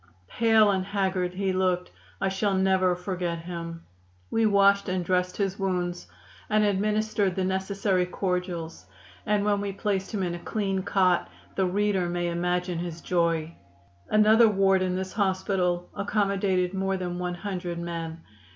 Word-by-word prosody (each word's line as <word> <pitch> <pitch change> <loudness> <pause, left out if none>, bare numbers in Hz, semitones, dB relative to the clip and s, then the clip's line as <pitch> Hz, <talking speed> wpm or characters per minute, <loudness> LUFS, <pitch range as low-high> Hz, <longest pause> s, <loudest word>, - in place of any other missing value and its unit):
Pale 220 -2 +4
and 190 -1 0
haggard 190 -2 -1
he 190 0 0
looked. 185 -1 0 0.3
I 195 - 0
shall 195 +1 0
never 190 -1 +3
forget 180 -2 -3
him. 170 -1 -6 0.5
We 225 -1 +3
washed 200 -1 +4
and 185 -1 -1
dressed 180 0 0
his 195 -1 -1
wounds 180 -2 -2 0.4
and 215 0 +3
administered 210 -1 +1
the 190 - 0
necessary 190 -1 0
cordials, 180 - -3 0.4
and 210 -1 +2
when 205 -1 +2
we 200 -1 -2
placed 195 -1 -2
him 205 -4 -1
in 175 -1 -1
a 175 - -5
clean 195 -1 -2
cot 185 - +2 0.2
the 190 - +1
reader 195 -1 +1
may 175 0 -1
imagine 180 0 -1
his 170 -1 -5
joy. 170 -2 0 0.6
"Another 215 +2 +6
ward 195 -2 +3
in 185 -1 0
this 185 0 -4
hospital 185 -3 0
accommodated 195 -3 0
more 195 0 -1
than 180 -1 -4
one 180 0 -2
hundred 180 -2 -4
men. 165 -1 -5
185 Hz, 150 wpm, -26 LUFS, 180-200 Hz, 0.6 s, Another